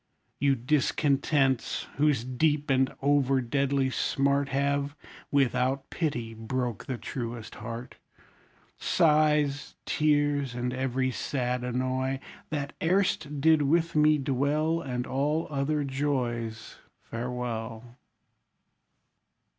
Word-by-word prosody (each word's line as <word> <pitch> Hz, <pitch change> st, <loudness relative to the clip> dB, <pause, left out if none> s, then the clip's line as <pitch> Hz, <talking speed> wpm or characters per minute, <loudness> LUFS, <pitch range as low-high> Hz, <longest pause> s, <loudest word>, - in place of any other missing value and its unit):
You 140 Hz, 0 st, +3 dB
discontents, 135 Hz, 0 st, +1 dB
whose 145 Hz, -5 st, +3 dB
deep 145 Hz, +3 st, +1 dB
and 130 Hz, 0 st, +3 dB
over 140 Hz, -2 st, +3 dB
deadly 135 Hz, +2 st, +1 dB
smart 140 Hz, +1 st, +1 dB
Have, 140 Hz, +1 st, 0 dB, 0.3 s
without 135 Hz, 0 st, +1 dB
pity, 120 Hz, -9 st, -2 dB
broke 120 Hz, 0 st, -3 dB
the 130 Hz, -, -2 dB
truest 115 Hz, -1 st, -5 dB
heart. 115 Hz, +2 st, -7 dB, 0.8 s
Sighs, 150 Hz, -2 st, +2 dB
tears, 145 Hz, -4 st, +1 dB
and 125 Hz, 0 st, -2 dB
every 130 Hz, 0 st, 0 dB
sad 125 Hz, -1 st, -2 dB
annoy, 130 Hz, +2 st, -1 dB, 0.3 s
That 145 Hz, -2 st, -3 dB
erst 160 Hz, -5 st, +1 dB
did 160 Hz, +1 st, +5 dB
with 165 Hz, +4 st, +2 dB
me 150 Hz, 0 st, +5 dB
dwell, 145 Hz, +4 st, 0 dB
And 125 Hz, -4 st, -3 dB
all 150 Hz, +5 st, 0 dB
other 145 Hz, +1 st, 0 dB
joys, 125 Hz, -5 st, -2 dB, 0.2 s
Farewell! 115 Hz, -1 st, -4 dB
135 Hz, 100 wpm, -28 LUFS, 125-145 Hz, 0.8 s, did